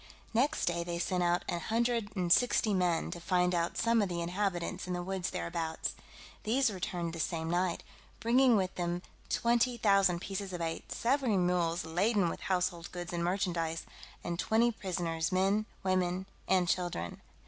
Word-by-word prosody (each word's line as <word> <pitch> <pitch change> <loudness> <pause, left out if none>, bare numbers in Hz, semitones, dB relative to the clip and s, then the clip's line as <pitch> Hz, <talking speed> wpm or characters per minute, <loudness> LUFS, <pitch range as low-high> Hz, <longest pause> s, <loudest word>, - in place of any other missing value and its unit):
Next 275 +7 +2
day 170 0 0
they 170 0 -3
sent 180 +1 0
out 175 0 +1
an 175 - -1
hundred 230 +2 0
and 175 -2 +4
sixty 235 -3 +3
men 180 -3 +1
to 175 - -5
find 180 0 +2
out 170 0 0
some 230 0 +3
of 200 - 0
the 175 -1 -2
inhabitants 180 +1 -2
in 180 - -2
the 175 0 -2
woods 190 0 -2
thereabouts; 165 -1 -3 0.5
these 245 +2 +2
returned 175 -3 -3
the 165 - -6
same 160 0 -1
night, 175 0 0 0.4
bringing 245 +1 +4
with 190 -2 +1
them 175 0 -2 0.3
20,000 220 -6 +3
pieces 195 +1 -5
of 175 - -3
eight, 165 -1 -4
several 250 -4 +1
mules 175 -2 +1
laden 180 +3 +2
with - - -5
household 180 -2 -1
goods 175 -1 -6
and 170 0 -1
merchandise, 170 -3 -1 0.4
and 170 0 -3
twenty 230 +2 +3
prisoners, 175 -6 -2
men, 195 +4 +2 0.2
women, 185 0 +1 0.2
and 185 -2 +3
children. 170 - -2
180 Hz, 165 wpm, -32 LUFS, 175-205 Hz, 0.5 s, and